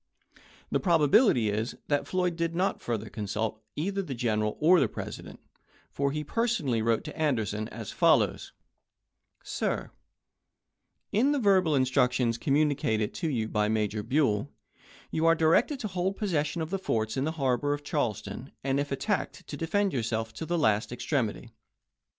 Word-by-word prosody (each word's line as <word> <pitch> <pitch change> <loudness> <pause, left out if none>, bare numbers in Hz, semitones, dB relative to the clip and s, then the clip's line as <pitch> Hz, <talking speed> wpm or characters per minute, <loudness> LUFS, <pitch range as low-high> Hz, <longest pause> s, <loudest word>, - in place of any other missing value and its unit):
"1 - - -24 0.3
The - - +2
probability 160 - +4
is, 110 +3 -2
that 145 -1 0
Floyd 180 -2 0
did 165 0 -2
not 185 +3 0
further 110 -2 -3
consult 110 +1 -3
either 195 +6 -1
the 145 -9 -5
General 110 -3 0
or 170 +4 +6
the 135 - +3
President, - - -8 0.5
for 140 0 0
he 150 +1 -3
personally 155 - 0
wrote 115 0 +1
to 150 - -8
Anderson 110 -9 -1
as 110 -3 -7
follows: - - +2 0.9
Sir: - - -2 1.2
In 260 +8 +3
the - - +1
verbal 190 - +3
instructions 125 -3 +2
communicated 135 -7 +1
to 165 - -2
you 115 -6 -1
by 105 -1 +1
Major 105 -1 0
Buell, 125 -1 +1 0.6
you 160 +1 +1
are 165 - +6
directed 165 - +3
to 215 - -2
hold 185 0 -2
possession 165 -5 -1
of 160 - -7
the 195 - -1
forts 110 -11 -1
in 130 - 0
the 160 +2 -1
harbor 135 -2 0
of 145 0 -2
Charleston, 110 0 -3
and 135 +1 +1
if 145 0 -2
attacked 205 +9 -2
to - - -7
defend 195 +4 0
yourself 115 -3 -2
to 160 - -6
the 175 - 0
last 110 -8 +2
extremity. 120 -3 -2
140 Hz, 160 wpm, -28 LUFS, 110-165 Hz, 1.2 s, or